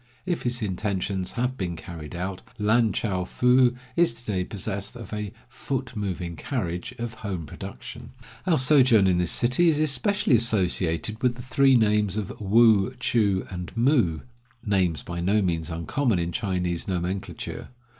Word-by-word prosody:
If 175 -2 -1
his 120 -1 -2
intentions 95 -1 -2
have 125 +2 -2
been 90 -3 -2
carried 80 -1 -9
out, 95 +1 -4 0.2
Lan 110 +2 +3
chou 95 -3 -1
foo 125 +5 +3 0.2
is 170 -8 +3
to 120 +1 -13
day 90 -2 0
possessed 100 +2 -4
of 115 -4 -9
a 105 -2 -4 0.2
"foot 130 0 -5
moving 90 -5 -3
carriage" 90 - -3
of 115 -1 -4
home 100 -7 -5
production. - - -9 0.4
Our 165 -4 +4
sojourn 130 -6 +5
in 90 -2 +3
this 90 -2 +2
city 125 +9 +3
is 155 - +2
especially 155 +4 +2
associated 105 -3 +1
with 125 -2 +2
the 120 - -9
three 135 +1 +4
names 105 -3 +2
of 105 -3 -3
Woo, 110 +2 +4
Choo, 100 -6 +1
and 90 -1 -6
Moo 115 - +2 0.2
— 125 -1 -36
names 90 -8 +1
by 85 0 -5
no 100 +5 +2
means 85 -4 -1
uncommon 95 - 0
in 85 0 -2
Chinese 90 -6 -2
nomenclature. 95 +1 -4
105 Hz, 160 wpm, -25 LUFS, 90-125 Hz, 0.4 s, sojourn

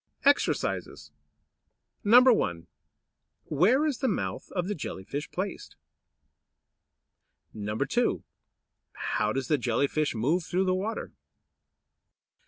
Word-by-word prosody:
EXERCISES 285 +1 +1 0.9
1. 220 - +4 0.8
Where 215 - +3
is 295 -5 -1
the 265 - 0
mouth 205 - -3
of 180 -2 -1
the 205 - -1
Jelly 140 - -6
fish 145 +9 -5
placed? 190 +1 -5 1.8
2. 105 0 -1 0.7
How 105 0 -1
does 130 +1 -2
the 150 0 +2
Jelly 120 +2 +1
fish 150 -2 -1
move 150 +11 +1
through 185 +3 0
the 185 - +2
water? 200 +5 -3
175 Hz, 100 wpm, -28 LUFS, -, 1.8 s, 1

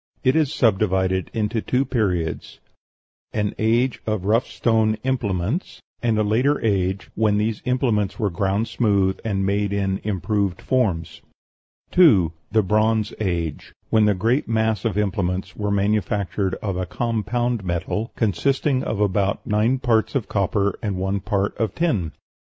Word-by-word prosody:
It 130 +1 +3
is 155 -3 +2
subdivided 95 - +1
into 110 0 -1
two 130 +5 0
periods: 95 - -2 0.7
an 105 -1 -1
age 115 +3 +1
of 110 -4 -1
rough 115 +5 +2
stone 110 -2 +1
implements; 115 - -2 0.2
and 115 -2 +1
a 110 - +2
later 125 +8 +2
age, 95 -2 0
when 105 -1 +2
these 105 +1 -1
implements 120 -6 0
were 105 -6 0
ground 100 +5 0
smooth 100 -5 +1
and 95 -3 -1
made 100 +1 0
in 95 -1 -1
improved 100 -1 -1
forms. 90 -11 -1 0.7
2. 100 - +5 0.2
The 110 0 +3
Bronze 110 +2 +1
Age, 85 -7 -3 0.2
when 110 -1 +4
the 105 -1 +3
great 115 +9 +1
mass 110 -2 0
of 105 -4 0
implements 95 -2 -1
were 105 -1 -2
manufactured 100 -2 0
of 100 -4 -2
a 90 -1 -2
compound 120 +1 -1
metal, 90 +5 -2
consisting 130 - +1
of 105 - -3
about 100 -1 0
nine 110 +5 +2
parts 120 -3 +1
of 130 -6 -1
copper 100 0 0
and 100 -3 -2
one 95 +2 -1
part 100 0 -1
of 110 -4 -1
tin. 110 - 0
105 Hz, 145 wpm, -22 LUFS, 95-115 Hz, 0.7 s, 2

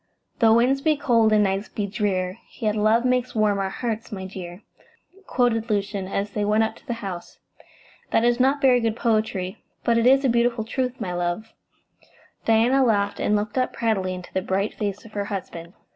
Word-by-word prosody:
"'Tho' 225 -1 +5
winds 255 +4 +3
be 310 0 +2
cold 235 -6 +3
and 210 -1 +4
nights 195 +1 -1
be 205 - -3
drear, 195 -2 -2 0.2
Yet 215 -2 0
love 220 +3 +3
makes 250 -1 0
warm 210 -2 +2
our 195 -1 -1
hearts, 225 +2 -4
my 190 -2 -5
dear,'" 185 0 -8 0.6
quoted 235 -2 +1
Lucian, 200 -2 -1
as 200 +1 -2
they 210 0 -2
went 210 +2 +3
up 220 - -2
to - - -22
the 240 - -1
house. 180 -3 -7 0.7
"That 225 - +2
is 240 +1 +2
not 270 +3 +3
very 255 -2 +5
good 225 -2 0
poetry, 215 -6 -1 0.2
but 230 -1 +3
it 230 - +3
is 270 +2 +5
a - - +5
beautiful 235 -1 +1
truth, 255 +2 -3
my 185 -5 -3
love." 175 +5 -3 0.9
Diana 235 +4 +4
laughed, 205 -4 +1
and 210 - +1
looked 210 +4 -1
up 255 - 0
proudly 195 -5 -1
into 180 -1 -10
the 190 - 0
bright 195 +2 -1
face 205 +1 -4
of 225 - -13
her 205 -1 -2
husband. 175 -4 -6
215 Hz, 195 wpm, -24 LUFS, 195-235 Hz, 0.9 s, Tho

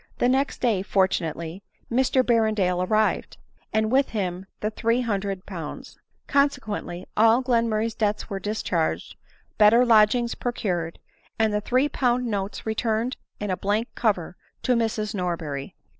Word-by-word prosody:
The 245 - +2
next 270 +2 +1
day, 225 -7 +2
fortunately, 180 -3 -1 0.3
Mr 260 +1 +3
Berrendale 215 -7 +2
arrived, 215 0 +1 0.3
and 220 0 +1
with 270 +1 +3
him 190 -3 -3
the 215 - -2
300Z. 200 -8 -2 0.3
Consequendy, 220 -10 0
all 225 +4 +5
Glenmurray's 230 -3 +1
debts 210 -1 -1
were 200 - -4
1 - - -8
discharged, 170 - -1 0.4
better 225 +4 +6
lodgings 235 +1 +4
procured, 180 -9 -2 0.4
and 220 -2 +2
the 210 - 0
three 255 +6 +2
pound 250 -3 +1
notes 200 -3 -3
returned 225 +2 -1 0.2
in 205 -2 -2
a - - +1
blank 210 +4 0
cover 190 -7 0 0.3
to 255 - +3
Mrs. 225 -2 0
Norberry. 165 -7 -3
215 Hz, 130 wpm, -25 LUFS, 190-235 Hz, 0.4 s, better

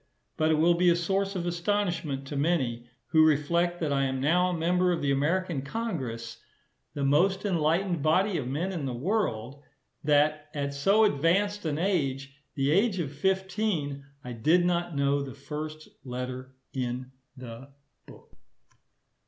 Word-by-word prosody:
But 155 0 +1
it 160 - +4
will 165 +3 +4
be 175 +1 +3
a 170 - +5
source 195 +3 -1
of 175 -2 -2
astonishment 170 -5 -1
to 145 - -6
many, 130 -6 0 0.2
who 155 +4 +5
reflect 170 +3 +2
that 150 -3 0
I 135 0 +2
am 130 0 -2
now 175 +6 +3
a 180 - -2
member 180 +2 +2
of 170 - 0
the 140 - 0
American 160 +2 0
Congress, 135 - -4 0.6
the 145 - -2
most 185 +9 +2
enlightened 170 -1 +1
body 185 +6 +2
of 125 - -4
men 160 +9 -2
in 160 -7 -3
the 125 - -3
world, 140 - -2 0.4
that 150 0 +2
at 140 -1 -2
so 195 +10 +3
advanced 200 +4 +2
an 150 -1 -1
age, 140 -7 -1 0.2
the 140 0 +1
age 200 +4 +3
of 150 -5 -3
fifteen, 190 -4 -1 0.2
I 125 - -6
did 160 +10 +3
not 175 -2 0
know 140 0 +2
the 135 -2 -6
first 155 +2 -7 0.2
letter 130 +1 -6 0.2
in 125 0 -3 0.3
the 125 +1 -9 0.4
book. - - -16
155 Hz, 160 wpm, -28 LUFS, 140-180 Hz, 0.6 s, a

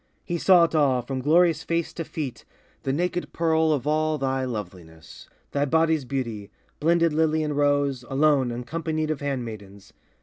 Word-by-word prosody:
He 175 -2 -2
saw 180 -1 +6
it 165 - +1
all, 135 -5 +2
from 130 +1 -4
glorious 165 +4 +3
face 170 -1 -2
to 165 - -4
feet 150 -5 -6 0.4
The 135 - -2
naked 175 +4 -2
pearl 160 -1 +2
of 145 -3 -1
all 155 +1 +1
thy 135 -1 -1
loveliness, 90 - -8 0.2
Thy 145 0 +1
body's 160 -1 +2
beauty, 115 -6 -4 0.3
blended 165 0 +2
lily 160 0 +1
and 150 -1 -2
rose, 145 -3 +1
Alone, 140 -2 +2
uncompanied 155 +6 -3
of 150 - -4
handmaidens. 110 -8 -6
145 Hz, 160 wpm, -25 LUFS, 130-160 Hz, 0.4 s, saw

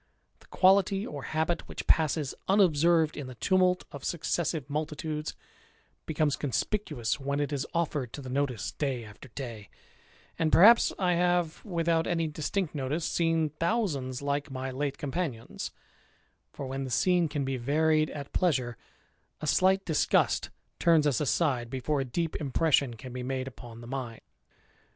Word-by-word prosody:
The - - -21
quality 195 +1 +3
or 145 -2 -6
habit 160 +4 -1
which - - -6
passes 155 -3 +2
unobserved 170 -4 +4
in 145 -3 -6
the 130 - -9
tumult 180 - +2
of 140 - -9
successive 160 -3 -1
multitudes, 150 +1 -3 0.7
becomes 155 -2 +1
conspicuous 140 - -1
when 140 +1 -2
it 145 0 -1
is 140 -1 -2
offered 150 -7 -1
to 145 - -6
the - - -8
notice 130 -4 -1
day 130 -6 -2
after 105 +4 -12
day; 115 -6 -6 0.7
and 160 -1 +2
perhaps 230 +7 +7
I 180 -2 +2
have, 175 -2 +1
without 165 -3 0
any 165 -2 0
distinct 155 +3 -2
notice, 150 +3 -2
seen 165 -2 +1
thousands 150 - -1
like 145 +1 -1
my 130 0 -4
late 140 +1 -2
companions; 145 -6 -4 0.8
for, 140 - -6
when 135 +1 -3
the 130 - -5
scene 175 +6 +3
can 145 -2 -2
be 135 0 -2
varied 155 +4 +2
at 145 -1 -8
pleasure, 130 - +1 0.6
a - - -5
slight 190 +5 +3
disgust 160 -3 +2 0.3
turns 165 -3 +4
us 145 -2 +2
aside 130 -2 +1
before 135 +3 -1
a - - -2
deep 160 +6 -2
impression 140 -3 +1
can 125 +2 -9
be 125 - -4
made 130 +1 -3
upon 120 -3 -10
the 120 - -10
mind. 125 -3 -5
150 Hz, 155 wpm, -29 LUFS, 130-170 Hz, 0.8 s, perhaps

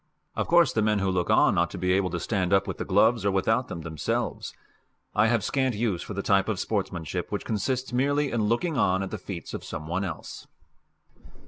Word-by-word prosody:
Of - - -1
course 170 -4 +4
the 110 - +1
men 105 0 +2
who 95 -1 0
look 90 -2 -1
on - - +4
ought - - +2
to - - -7
be 90 0 +1
able 95 -1 +1
to 85 - -3
stand 95 -3 -1
up 100 0 +4
with 95 -3 -5
the - - -3
gloves, 110 +3 +3
or 100 - +2
without 110 +6 +1
them, 85 - -6
themselves; 80 -4 -3 0.6
I 105 +2 +4
have 115 -3 +1
scant 130 +1 0
use 105 -5 -1
for 105 - -7
the 100 - -3
type 100 +1 +2
of 100 -4 -1
sportsmanship 95 -8 -3
which - - -3
consists 125 +5 -2
merely 140 +3 +1
in 115 -3 0
looking 130 +8 0
on 95 +1 +2
at 95 - -6
the - - -4
feats 90 -5 -7
of - - -5
some 75 - -6
one 90 +4 -1
else. 85 -5 -7
100 Hz, 225 wpm, -26 LUFS, 95-120 Hz, 0.6 s, course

